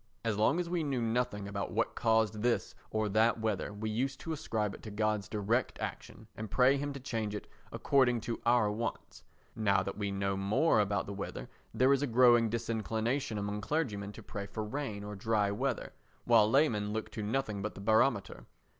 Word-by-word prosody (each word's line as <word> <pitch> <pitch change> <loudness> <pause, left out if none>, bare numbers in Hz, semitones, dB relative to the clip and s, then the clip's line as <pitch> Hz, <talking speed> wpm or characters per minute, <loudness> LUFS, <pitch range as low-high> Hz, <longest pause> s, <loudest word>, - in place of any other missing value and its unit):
As 110 -2 +1
long 110 - +3
as 175 - -1
we 175 0 -1
knew 140 -4 -1
nothing 115 -3 -1
about 100 0 -3
what - - 0
caused 110 -2 +1
this 120 +1 0 0.2
or 110 0 0
that 110 +3 +3
weather 110 -3 -1
we 110 +1 -4
used 130 +5 -1
to 165 - -3
ascribe 110 -9 -2
it - - -11
to 110 - -8
God's 105 -1 -1
direct 110 +4 0
action - - -6
and 110 -1 -6
pray 130 +5 +4
him 145 +1 -2
to 140 - -7
change 115 -6 -3
it 105 - -6 0.3
according 130 -4 +3
to 115 +1 -4
our 120 -3 +3
wants: 110 +1 -5 0.3
now 105 -3 +2
that 100 +1 -5
we 100 -1 -1
know 100 0 -1
more 110 +9 +2
about 100 -2 +1
the 100 - -6
weather 100 - -6 0.2
there 130 +2 +4
is 135 - +1
a 145 - 0
growing 120 -1 +5
disinclination 115 +2 -1
among 100 +1 -3
clergymen 105 -7 -2
to 115 - -11
pray 100 -1 -6
for 110 - -4
rain 105 -2 -4
or 105 0 -6
dry 105 0 +1
weather, 100 - -2 0.3
while 110 -3 +5
laymen 110 -6 +2
look 110 0 -4
to 110 - -5
nothing 105 -1 -1
but 105 +1 -4
the - - -9
barometer. 110 - +1
110 Hz, 200 wpm, -32 LUFS, 105-125 Hz, 0.3 s, growing